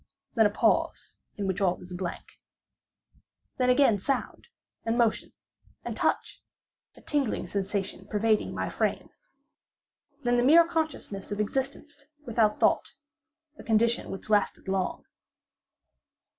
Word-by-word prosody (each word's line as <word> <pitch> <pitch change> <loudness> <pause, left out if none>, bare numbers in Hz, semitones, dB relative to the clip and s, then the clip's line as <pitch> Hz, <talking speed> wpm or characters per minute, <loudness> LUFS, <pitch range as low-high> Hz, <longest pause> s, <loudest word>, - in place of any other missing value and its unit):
Then 225 -3 +5
a - - -2
pause 205 - 0 0.2
in 205 - -2
which 190 0 -1
all 180 -2 +2
is 180 0 -10
blank. 180 -1 -6 1.2
Then 250 0 +3
again 250 -5 +4
sound, 270 +5 -3 0.4
and 225 +1 0
motion, 235 -3 +1 0.5
and - - -4
touch—a - - -4
tingling 280 -10 -1
sensation 195 0 -3
pervading 215 +1 +1
my - - -2
frame. - - -2 1.1
Then 245 0 +2
the 240 - +3
mere 330 +5 +7
consciousness 315 - -3
of 205 - -3
existence, 275 +6 -3 0.2
without 220 -3 +2
thought—a 310 +1 -3
condition 230 +1 +2
which 195 - -7
lasted 205 -1 +1
long. 190 -1 -2
225 Hz, 115 wpm, -28 LUFS, 200-275 Hz, 1.2 s, mere